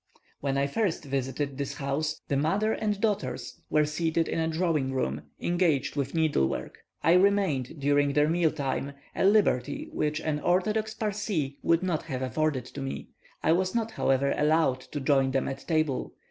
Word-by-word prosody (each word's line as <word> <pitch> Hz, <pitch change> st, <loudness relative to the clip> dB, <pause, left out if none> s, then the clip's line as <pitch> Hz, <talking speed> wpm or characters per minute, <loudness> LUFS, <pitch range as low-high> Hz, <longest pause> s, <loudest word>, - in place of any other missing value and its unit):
When 135 Hz, -1 st, -1 dB
I 140 Hz, -, +2 dB
first 175 Hz, +2 st, -1 dB
visited 135 Hz, +1 st, -2 dB
this 140 Hz, 0 st, -3 dB
house, 150 Hz, +3 st, -2 dB
the 140 Hz, -, 0 dB
mother 195 Hz, +10 st, +1 dB
and 210 Hz, -2 st, -1 dB
daughters 210 Hz, -1 st, -2 dB
were 150 Hz, 0 st, +3 dB
seated 160 Hz, +2 st, 0 dB
in -, -, -1 dB
a 160 Hz, -, +1 dB
drawing 160 Hz, -5 st, 0 dB
room, 70 Hz, -, -1 dB, 0.2 s
engaged 175 Hz, -7 st, +1 dB
with 140 Hz, +1 st, -2 dB
needlework. 155 Hz, -, 0 dB, 0.2 s
I 165 Hz, +3 st, +5 dB
remained 180 Hz, -9 st, +2 dB
during 145 Hz, 0 st, +2 dB
their 150 Hz, +1 st, +4 dB
meal 165 Hz, 0 st, +3 dB
time, 140 Hz, -1 st, -3 dB, 0.2 s
a -, -, 0 dB
liberty 190 Hz, -, +2 dB
which 150 Hz, 0 st, -1 dB
an 155 Hz, -2 st, -1 dB
orthodox 210 Hz, +6 st, +1 dB
Parsee 200 Hz, -10 st, -2 dB
would 165 Hz, +2 st, +2 dB
not 175 Hz, -4 st, 0 dB
have 130 Hz, -4 st, -3 dB
afforded 135 Hz, -1 st, 0 dB
to 140 Hz, -, -8 dB
me; 135 Hz, 0 st, -5 dB, 0.3 s
I -, -, +4 dB
was 185 Hz, +4 st, +1 dB
not, 225 Hz, -1 st, 0 dB
however, 135 Hz, -4 st, +1 dB
allowed 150 Hz, -3 st, +2 dB
to 145 Hz, +3 st, -6 dB
join 135 Hz, -1 st, +3 dB
them 135 Hz, 0 st, 0 dB
at 135 Hz, 0 st, -6 dB
table. 155 Hz, -5 st, 0 dB
150 Hz, 175 wpm, -28 LUFS, 140-175 Hz, 0.3 s, I